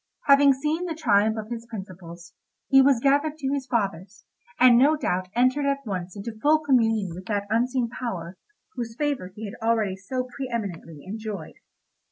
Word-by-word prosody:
Having 280 0 +6
seen 300 +6 -2
the 335 -2 -4
triumph 220 -7 +2
of 215 +1 -6
his 235 0 -6
principles, 180 -5 -10 0.4
he 270 0 +7
was 270 -2 +4
gathered 285 +4 +2
to 270 -3 -3
his 275 -2 -3
fathers, 200 -5 -3 0.3
and 250 -1 +7
no 280 +6 +5
doubt 185 -9 -1
entered 255 +4 +2
at 275 -1 -1
once 185 -3 -5
into 220 +2 -7
full 305 +2 +5
communion 225 - +1
with 185 +2 -10
that 205 -2 -1
unseen 245 +2 +1
power 190 -8 -5 0.4
whose 230 -2 -5
favour 285 -11 -2
he 220 - -7
had 200 - -7
already 220 -4 +1
so 250 +7 -4
pre 265 -2 -4
eminently 170 -9 -5
enjoyed. 210 -3 -6
230 Hz, 175 wpm, -25 LUFS, 195-270 Hz, 0.4 s, he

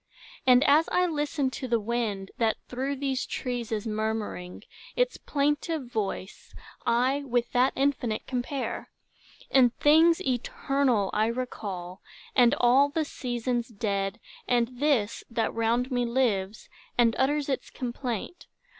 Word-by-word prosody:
And 250 +1 +7
as 300 +4 +4
I 360 - +3
listen 295 -4 -1
to 260 - -5
the 235 -1 +2
wind, 210 -3 -2
that 225 -2 +2
through 265 +3 -2
These 270 -1 -1
trees 245 -2 -4
is 215 -1 -2
murmuring, 215 -4 -3 0.3
its - - +1
plaintive 295 +1 -1
voice 210 -4 -5 0.3
I 250 +4 +2
with 245 -3 -1
that 250 +2 +3
infinite 265 -5 0
compare; 255 +1 -3 0.6
And 250 -3 +5
things 325 +3 +5
eternal 255 - 0
I 215 +1 +2
recall, 200 -7 -5 0.3
and 245 +1 +5
all 265 +3 +5
The 310 +2 -1
seasons 240 -3 -2
dead, 200 -1 -2 0.3
and 240 -1 +2
this, 270 -8 +1
that 230 -2 -1
round 235 +3 0
me 245 -1 +1
lives, 220 -5 0 0.3
And 235 -2 +4
utters 290 +2 +1
its 270 -2 -2
complaint. 250 - -5
245 Hz, 130 wpm, -27 LUFS, 225-275 Hz, 0.6 s, And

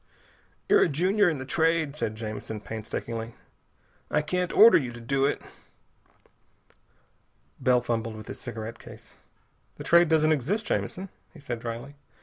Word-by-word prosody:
"You're - - +5
a - - +4
junior 185 +6 +2
in 160 - -2
the 130 - -6
Trade," 160 0 +1
said 110 -7 -3
Jamison 110 0 -6
painstakingly. 115 +1 -6 0.7
"I 150 - +1
can't 180 +3 -1
order 225 +2 +8
you 125 -5 -4
to 120 - -10
do 135 +4 0
it." 140 - -1 2.2
Bell 125 -1 +3
fumbled 115 -2 -2
with 110 0 -10
his - - -8
cigarette 115 -2 -6
case. - - -13 0.6
"The - - -8
Trade 170 -1 +5
doesn't 155 -1 +4
exist, 165 - 0
Jamison," 190 +1 -3 0.3
he - - -12
said 120 -4 -5
dryly. 115 +4 -6
135 Hz, 145 wpm, -27 LUFS, 115-165 Hz, 2.2 s, order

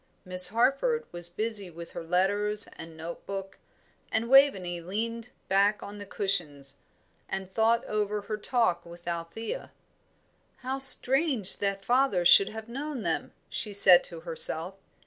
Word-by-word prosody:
Miss 180 0 +7
Harford 275 - +1
was 175 0 -1
busy 210 +1 -2
with 170 0 -11
her - - -7
letters 205 +5 0
and 165 -1 -11
note 165 +2 -8
book, 195 -1 -7 0.5
and 225 +1 -1
Waveney 190 -11 +4
leaned 225 +6 -5 0.2
back 200 +2 +2
on 205 +1 -9
the 205 - -9
cushions, 150 -10 -4 0.5
and 190 -1 -5
thought 230 +2 +2
over 210 0 -2
her 210 +1 -5
talk 225 -5 0
with 170 0 -14
Althea. 170 - -5 0.9
"How 265 +1 -3
strange 270 - +4
that 195 -1 -3
father 245 -8 +1
should 195 +3 +6
have 220 0 -9
known 270 0 -6
them!" 165 -2 -2 0.2
she 210 -2 -2
said 185 -3 +6
to 165 -2 -8
herself. 165 +1 -2
200 Hz, 145 wpm, -27 LUFS, 175-230 Hz, 0.9 s, Miss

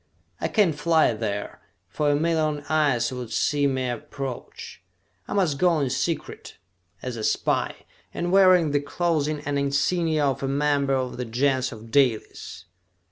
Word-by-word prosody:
I - - -1
can't 200 -7 +2
fly 155 -3 +2
there, 105 -2 -4 0.3
for 150 -1 -1
a 145 - +3
million 155 -1 0
eyes 140 -6 +1
would 125 -3 -6
see 145 +4 +1
me 130 -2 -1
approach! 125 +2 -7 0.5
I - - -4
must 175 -9 +1
go 175 -3 +3
in 135 -3 -1
secret, 155 +5 -3 0.5
as 125 -2 -4
a 110 - -5
spy, - - -1 0.3
and 175 0 -3
wearing 185 -5 +5
the 145 - +2
clothing 155 -1 -1
and 145 -1 -2
insignia 150 +3 +1
of 135 -2 -1
a 135 - -1
member 140 0 +1
of 130 -1 -3
the 125 - -3
Gens 130 +2 0
of 115 -1 -11
Dalis!" 130 -5 0
145 Hz, 155 wpm, -24 LUFS, 130-155 Hz, 0.5 s, wearing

